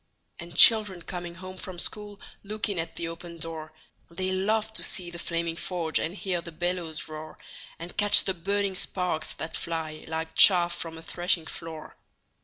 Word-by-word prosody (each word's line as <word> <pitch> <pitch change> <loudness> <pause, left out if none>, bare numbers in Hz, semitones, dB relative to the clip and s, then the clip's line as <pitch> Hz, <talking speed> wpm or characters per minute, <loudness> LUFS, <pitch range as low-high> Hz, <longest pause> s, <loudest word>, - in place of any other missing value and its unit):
And 170 -1 -9
children 210 -6 +7
coming 175 -1 -6
home 185 +1 -9
from 185 -1 -7
school 205 +2 -2 0.2
Look 215 +2 -3
in 195 -4 -1
at 165 0 -4
the 170 - -4
open 170 0 -8
door; 160 -1 -4 0.4
They 185 +3 -2
love 215 +3 0
to - - +4
see 175 -3 0
the 170 - -8
flaming 170 -1 -2
forge, 170 -2 -1
And 170 - -3
hear 185 -4 -2
the 170 - -9
bellows 175 -1 -3
roar, 155 0 -9 0.4
And 170 +2 -8
catch 205 -1 +5
the 190 - 0
burning 200 +3 -1
sparks 180 -3 -2
that 160 - -5
fly 160 -2 -4
Like 160 0 -4
chaff 175 -2 +7
from 165 -1 -5
a 160 - -11
threshing 175 -1 0
floor. 160 -1 -8
175 Hz, 180 wpm, -27 LUFS, 165-190 Hz, 0.4 s, children